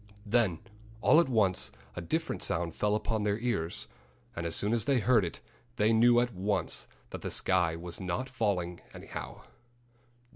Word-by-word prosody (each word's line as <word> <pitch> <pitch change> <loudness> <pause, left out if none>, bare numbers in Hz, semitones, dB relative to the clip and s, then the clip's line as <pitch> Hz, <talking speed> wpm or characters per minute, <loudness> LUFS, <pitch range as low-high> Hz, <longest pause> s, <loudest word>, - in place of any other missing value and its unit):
Then 105 -6 +2 0.4
all 155 - +6
at 170 - +2
once 105 -7 +2 0.2
a - - -4
different 160 - -2
sound 85 -1 -1
fell 105 +3 +1
upon 110 0 -1
their 105 0 +1
ears. 115 -9 -2 0.5
And 85 0 -3
as 80 - 0
soon 105 +2 +1
as 115 -2 +1
they 140 -1 +3
heard 115 -1 +4
it 85 - -5 0.3
they 110 -1 +3
knew 120 +2 +6
at 120 -1 0
once 100 +3 -1 0.2
that - - -6
the - - -3
sky 90 -3 +2
was 85 +2 -6
not 95 +8 -2
falling, 100 -9 -1 0.2
anyhow. - - -8
105 Hz, 170 wpm, -30 LUFS, 90-120 Hz, 0.5 s, all